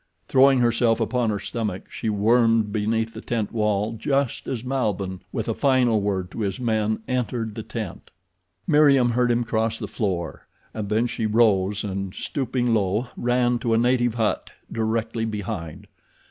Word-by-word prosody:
Throwing 135 -1 +5
herself 115 -1 +2
upon 125 -3 0
her 105 - 0
stomach 105 -5 -4
she 110 - -3
wormed 115 +1 +3
beneath 110 +1 0
the 110 - -8
tent 115 -4 -2
wall 105 -1 0
just 135 +3 -1
as 120 -3 -3
Malbihn, 105 -8 -2
with 115 -4 -3
a 115 - 0
final 125 -5 +2
word 95 -3 -2
to - - -7
his 100 -3 -2
men, 110 -2 0
entered 120 -3 -2
the 110 - -5
tent. 110 -4 -7 0.6
Meriem 140 -6 +5
heard 120 +1 +2
him 120 0 +2
cross 115 0 -1
the - - -5
floor, 90 -7 -3 0.3
and 105 -2 -4
then 110 +3 +2
she 115 -2 -2
rose 105 -3 +2
and, 95 -2 -4
stooping 125 -3 -1
low, 105 +3 0
ran 120 0 +1
to 115 0 +1
a - - +3
native 120 0 +2
hut 110 -2 -1 0.2
directly 115 0 -1
behind. 105 -7 -5
115 Hz, 160 wpm, -24 LUFS, 105-120 Hz, 0.6 s, Throwing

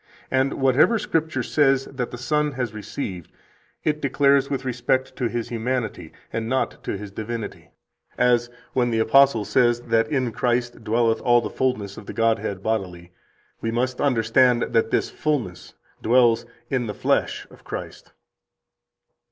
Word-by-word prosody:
And 130 +1 +2
whatever 135 - +4
Scripture 160 - -1
says 135 0 +2
that 125 -3 -4
the 120 - -7
Son 150 +3 0
has 125 -4 -3
received, 100 - -6 0.5
it 150 0 0
declares 140 0 +3
with 135 -2 -3
respect 130 +1 -1
to 125 - 0
His 120 0 -3
humanity, 115 -7 -3 0.2
and 115 0 -2
not 130 +1 -1
to - - -2
His 100 0 -8
divinity; 110 +2 -6 0.5
as, 120 -1 +3 0.2
when 125 -2 +2
the 115 - 0
apostle 115 0 +4
says 120 0 +3
that 115 -1 +1
in 130 -5 0
Christ 120 0 -1
dwelleth 115 +1 +1
all 120 -1 +4
the - - -5
fullness 105 -7 -2
of - - -10
the - - -6
Godhead 115 -4 0
bodily, 90 -6 -3 0.5
we 115 - -1
must 125 +2 -1
understand 125 -1 +3
that 115 0 +3
this - - 0
fullness 125 - -3 0.3
dwells 120 -1 +3 0.2
in 125 -3 0
the 105 - -5
flesh - - 0
of - - -17
Christ. - - -8
120 Hz, 150 wpm, -23 LUFS, 115-130 Hz, 0.5 s, whatever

